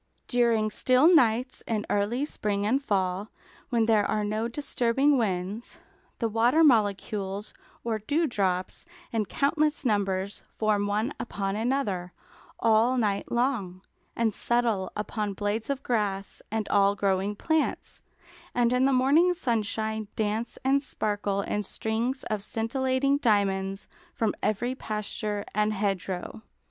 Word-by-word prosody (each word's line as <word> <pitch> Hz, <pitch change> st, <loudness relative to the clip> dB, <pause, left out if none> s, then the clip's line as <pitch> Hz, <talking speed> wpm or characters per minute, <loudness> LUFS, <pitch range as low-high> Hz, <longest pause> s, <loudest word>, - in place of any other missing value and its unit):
During 230 Hz, -3 st, +2 dB
still 260 Hz, +10 st, +4 dB
nights 250 Hz, -3 st, +3 dB
in 215 Hz, -2 st, -1 dB
early 220 Hz, +7 st, 0 dB
spring 205 Hz, -8 st, -2 dB
and 265 Hz, +6 st, +1 dB
fall, 195 Hz, -2 st, -1 dB, 0.4 s
when 230 Hz, -3 st, +2 dB
there 220 Hz, -2 st, +4 dB
are 210 Hz, +1 st, 0 dB
no 215 Hz, +2 st, -1 dB
disturbing 270 Hz, +1 st, +1 dB
winds, 200 Hz, -1 st, -2 dB, 0.4 s
the 230 Hz, -, 0 dB
water 235 Hz, +8 st, +3 dB
molecules 205 Hz, -5 st, +1 dB, 0.3 s
or 225 Hz, -2 st, -1 dB
dewdrops 205 Hz, -, -1 dB, 0.3 s
in 220 Hz, -3 st, -1 dB
countless 300 Hz, -, +1 dB
numbers 200 Hz, -3 st, 0 dB
form 210 Hz, -2 st, 0 dB
one 215 Hz, +7 st, 0 dB
upon 195 Hz, -4 st, -3 dB
another, 215 Hz, -7 st, -1 dB, 0.5 s
all 230 Hz, +3 st, +3 dB
night 205 Hz, -4 st, 0 dB
long, 230 Hz, -8 st, -1 dB, 0.3 s
and 225 Hz, -2 st, +1 dB
settle 230 Hz, -6 st, 0 dB
upon 210 Hz, -1 st, -3 dB
blades 210 Hz, +4 st, -2 dB
of 275 Hz, -1 st, -2 dB
grass 200 Hz, -4 st, -1 dB
and 220 Hz, -1 st, -2 dB
all 200 Hz, 0 st, +4 dB
growing 195 Hz, 0 st, 0 dB
plants, 315 Hz, +8 st, -1 dB, 0.5 s
and 240 Hz, 0 st, +3 dB
in 250 Hz, +1 st, +3 dB
the 275 Hz, -, +3 dB
morning 295 Hz, +8 st, +4 dB
sunshine 220 Hz, -, -1 dB
dance 220 Hz, +2 st, -2 dB
and 275 Hz, +1 st, +3 dB
sparkle 205 Hz, -6 st, -2 dB
in 210 Hz, +1 st, -2 dB
strings 225 Hz, +6 st, -2 dB
of 215 Hz, -2 st, -2 dB
scintillating 260 Hz, +6 st, 0 dB
diamonds 195 Hz, -5 st, +1 dB, 0.3 s
from 220 Hz, -2 st, 0 dB
every 240 Hz, +4 st, 0 dB
pasture 210 Hz, -3 st, -4 dB
and 210 Hz, +1 st, +1 dB
hedge 195 Hz, -3 st, -1 dB
row. 185 Hz, +4 st, -5 dB
220 Hz, 130 wpm, -27 LUFS, 205-245 Hz, 0.5 s, still